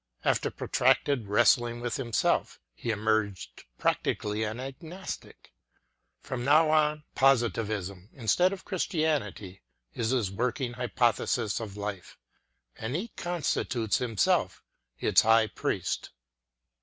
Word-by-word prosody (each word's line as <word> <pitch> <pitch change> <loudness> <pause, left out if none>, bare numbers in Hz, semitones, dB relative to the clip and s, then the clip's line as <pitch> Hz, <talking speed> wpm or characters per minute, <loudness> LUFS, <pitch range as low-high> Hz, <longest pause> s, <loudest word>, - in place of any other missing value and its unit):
After - - +2
protracted 130 -7 +1
wrest 115 +5 +5
ling 120 0 -5
with 120 +3 -2
himself, 120 -5 0
he 90 - -6
emerged 110 -2 -1
practically 105 +1 0
an 110 +1 -3
agnos 160 +9 -6
tic. - - -19 0.7
Prom 130 -2 -4
now 155 +4 +5
on, 150 -1 +2
Positivism, 110 -7 +1
instead 140 - +2
of 195 -1 -7
Chris 185 -4 -1
tianity, 140 - -2 0.3
is 115 -1 -1
his 120 -7 0
working 125 +4 -2
hypothesis 120 -2 0
of 105 -3 -7
life 100 -3 -6 0.6
ŌĆö - - -10
and 115 +5 -2
he 190 +8 -2
constitutes 140 - -1
himself 115 -6 +1 0.3
its - - +4
high 110 0 +5
priest. 110 - -3
120 Hz, 120 wpm, -28 LUFS, 105-140 Hz, 0.7 s, wrest